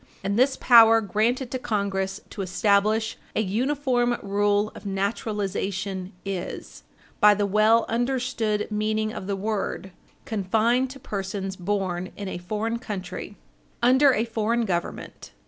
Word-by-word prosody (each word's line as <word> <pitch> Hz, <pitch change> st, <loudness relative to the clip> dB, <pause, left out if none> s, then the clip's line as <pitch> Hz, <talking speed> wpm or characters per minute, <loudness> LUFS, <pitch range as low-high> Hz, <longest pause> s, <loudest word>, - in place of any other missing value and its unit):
And 200 Hz, +1 st, -1 dB
this 265 Hz, +3 st, +3 dB
power 225 Hz, -2 st, +7 dB
granted 225 Hz, +5 st, 0 dB
to 260 Hz, -, -2 dB
Congress 200 Hz, -3 st, -2 dB
to 200 Hz, -, -5 dB
establish 205 Hz, +4 st, +1 dB, 0.2 s
an 220 Hz, -, 0 dB
uniform 245 Hz, +2 st, +1 dB
rule 205 Hz, +1 st, +1 dB
of -, -, -11 dB
naturalization 195 Hz, -2 st, -3 dB
is, 175 Hz, -, -5 dB, 0.4 s
by 210 Hz, 0 st, +7 dB
the 205 Hz, 0 st, 0 dB
well 215 Hz, +3 st, +4 dB
understood 240 Hz, -3 st, -1 dB
meaning 215 Hz, +1 st, -1 dB
of 190 Hz, -, -6 dB
the 200 Hz, -, -1 dB
word, 195 Hz, -1 st, -3 dB, 0.3 s
confined 225 Hz, +3 st, +1 dB
to 270 Hz, +1 st, -10 dB
persons 195 Hz, -3 st, -4 dB
born 185 Hz, -1 st, -2 dB
in 200 Hz, -, -5 dB
a 185 Hz, -, -5 dB
foreign 215 Hz, +5 st, -3 dB
country, 200 Hz, -3 st, -6 dB, 0.5 s
under 260 Hz, +3 st, +6 dB
a 225 Hz, -2 st, +1 dB
foreign 230 Hz, +1 st, 0 dB
Government. 175 Hz, -4 st, -4 dB
210 Hz, 130 wpm, -25 LUFS, 195-230 Hz, 0.5 s, power